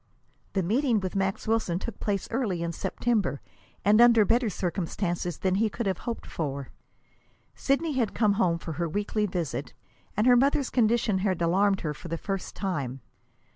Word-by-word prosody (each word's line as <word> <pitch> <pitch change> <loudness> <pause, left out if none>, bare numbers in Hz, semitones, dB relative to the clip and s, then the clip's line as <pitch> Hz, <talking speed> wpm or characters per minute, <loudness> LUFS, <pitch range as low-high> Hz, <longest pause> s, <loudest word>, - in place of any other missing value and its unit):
The 190 - +1
meeting 235 - +2
with 190 -1 -4
Max 195 +1 -1
Wilson 220 -6 +1
took 210 +3 -6
place 200 -2 -1
early 215 -8 -1
in 170 - -2
September, 210 -3 -1 0.5
and 210 +3 +6
under 235 -3 +7
better 230 +2 +2
circumstances 175 -2 -2
than 185 -1 0
he 215 +3 +2
could 235 +2 -4
have 190 -3 -1
hoped 230 - -5
for. 140 -4 -4 0.8
Sidney 295 +3 0
had 240 -6 0
come 210 -3 +3
home 180 -5 +2
for 165 - -7
her 170 - 0
weekly 210 +3 -1
visit, 175 -6 -4 0.4
and 215 - +3
her 250 -1 +7
mother's 275 +2 +2
condition 230 -4 +2
had 185 -2 0
alarmed 190 +4 +2
her 150 -3 -2
for 160 - -10
the 165 0 -3
first 195 +2 -4
time. 140 -9 -3
195 Hz, 175 wpm, -27 LUFS, 175-230 Hz, 0.8 s, under